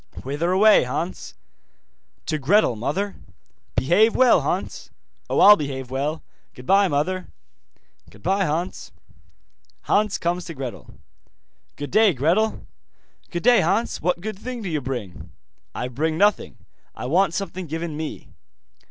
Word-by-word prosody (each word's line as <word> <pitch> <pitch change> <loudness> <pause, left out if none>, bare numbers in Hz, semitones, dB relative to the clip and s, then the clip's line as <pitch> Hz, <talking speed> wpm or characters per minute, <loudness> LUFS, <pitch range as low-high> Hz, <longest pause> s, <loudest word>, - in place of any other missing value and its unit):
'Whither 145 +6 -2
away, 210 +3 +6
Hans?' 165 - -5 0.9
'To 155 - -2
Gretel, 150 - +3
mother.' 175 - -3 0.6
'Behave 175 - +3
well, 255 -2 +5
Hans.' - - -3 0.4
'Oh, - - +1
I'll 210 - +9
behave 135 -6 -5
well. 145 +4 -2 0.3
Goodbye, 195 +10 +3
mother.' 180 +5 -1 0.8
'Goodbye, 190 - -1
Hans.' 165 +3 -3 0.9
Hans 210 - +1
comes 175 0 -2
to 165 - -8
Gretel. 130 -3 -8 0.8
'Good 145 - -7
day, 215 -1 +5
Gretel.' 170 - 0 0.6
'Good 170 - -4
day, 240 -1 +6
Hans. 205 +8 0
What 175 +1 0
good 215 0 -6
thing 245 0 -6
do 190 - -4
you 155 -3 -2
bring?' 120 -9 -6 0.5
'I 125 - -3
bring 155 +5 -2
nothing, 205 +2 +1 0.4
I - - -6
want 170 +5 +2
something 185 -3 -4
given 160 0 -4
me. 155 0 -6
170 Hz, 130 wpm, -23 LUFS, 140-200 Hz, 0.9 s, I'll